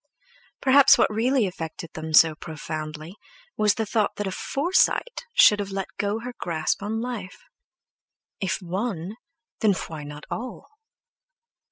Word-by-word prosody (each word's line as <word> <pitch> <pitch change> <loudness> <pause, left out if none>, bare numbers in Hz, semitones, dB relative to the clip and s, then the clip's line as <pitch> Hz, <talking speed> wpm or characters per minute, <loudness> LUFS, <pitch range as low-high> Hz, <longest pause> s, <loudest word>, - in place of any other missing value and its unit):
Perhaps 275 0 +7
what - - +2
really 240 +2 +2
affected 165 -2 -6
them 160 0 -6
so 160 0 +7
profoundly 155 0 -7 0.4
was 210 -1 +3
the 220 - -1
thought 215 0 0
that 205 - -3
a 190 - -2
Forsyte 365 - 0
should 210 - +7
have 200 -1 -3
let 195 -1 -4
go 205 +2 -1
her 250 +1 -6
grasp 160 0 -1
on 215 +2 -2
life. 230 -6 -6 1.0
If 185 -1 -2
one, 190 +1 -3 0.4
then 215 -3 +4
why 160 -4 -6
not 150 0 -9
all! 250 +3 -6
200 Hz, 140 wpm, -25 LUFS, 160-225 Hz, 1.0 s, Perhaps